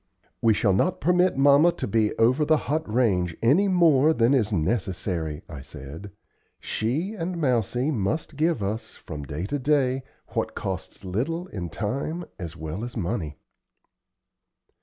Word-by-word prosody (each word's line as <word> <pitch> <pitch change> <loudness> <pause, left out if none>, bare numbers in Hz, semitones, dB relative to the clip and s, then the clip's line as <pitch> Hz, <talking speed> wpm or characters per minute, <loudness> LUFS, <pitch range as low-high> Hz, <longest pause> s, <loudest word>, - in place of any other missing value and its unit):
"We 110 -2 +4
shall 100 -2 +2
not 175 - +1
permit 180 -2 +3
mamma 145 +5 +6
to - - -4
be 110 0 +2
over 125 +7 +4
the 155 +1 +4
hot 150 -5 -2
range 95 -8 +1
any 155 - +4
more 160 -5 +5
than 115 +3 +3
is 110 -6 +2
necessary," 90 -4 -1
I 75 -5 -8
said. 75 +6 -9 0.5
"She 150 - -2
and 180 -3 -4
Mousie 125 0 +1
must 145 +7 -2
give 155 -6 +1
us, 105 +4 -4
from 75 - -8
day 75 +4 -4
to 145 +8 -2
day, 135 -2 +2 0.3
what - - -2
costs - - -5
little 135 - -2
in 90 -4 -5
time 135 - -3
as 85 -3 -6
well 80 +6 -5
as 120 0 -6
money." 85 -6 -3
115 Hz, 150 wpm, -25 LUFS, 95-150 Hz, 0.5 s, mamma